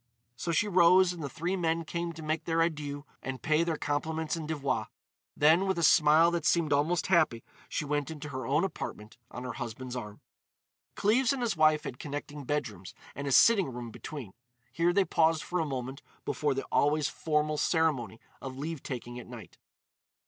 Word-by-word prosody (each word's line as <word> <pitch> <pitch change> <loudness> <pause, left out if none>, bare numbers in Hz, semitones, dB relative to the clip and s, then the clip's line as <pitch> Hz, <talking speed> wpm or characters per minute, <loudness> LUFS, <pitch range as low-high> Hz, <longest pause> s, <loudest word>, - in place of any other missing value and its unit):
So 170 +8 -3
she 210 +5 +2
rose 180 -1 +5
and 170 - -8
the 140 - -3
three 170 +5 -2
men 165 -2 0
came 170 +2 -3
to 160 0 -9
make 155 +1 -2
their 165 0 +2
adieux 145 -3 -3 0.2
and 130 -1 -5
pay 155 +1 +2
their 165 -2 -1
compliments 160 +3 -2
and 160 -2 -5
devoirs. 140 -8 -1 0.5
Then, 160 +6 +5
with 190 -2 0
a 170 - 0
smile 155 +1 +6
that 170 -2 -1
seemed 160 -2 +2
almost 155 +4 +1
happy, 155 -11 +2 0.3
she 150 - -2
went 145 0 -1
into 150 -2 -7
her 130 -2 -5
own 140 - +2
apartment 110 - -5
on 125 - -7
her 125 -1 -4
husband's 125 +3 -6
arm. 105 -4 -7 0.8
Cleves 235 +6 +3
and 260 -3 -3
his 225 -5 0
wife 155 -1 +4
had 125 - -7
connecting 145 0 -6
bedrooms 105 -11 -4 0.2
and 140 +1 -5
a - - -1
sitting 195 - +5
room 120 -1 -7
between. 125 -5 -8 0.4
Here 170 +1 +2
they 195 +2 +3
paused 160 -2 +2
for 180 - -2
a 160 - 0
moment 130 0 -5 0.2
before 145 -3 0
the 135 - -3
always 145 0 +2
formal 150 -1 -1
ceremony 145 -10 +1 0.2
of 130 -1 -7
leave 155 +1 -4
taking 120 -2 -6
at 120 - -11
night. - - -11
155 Hz, 190 wpm, -30 LUFS, 135-170 Hz, 0.8 s, smile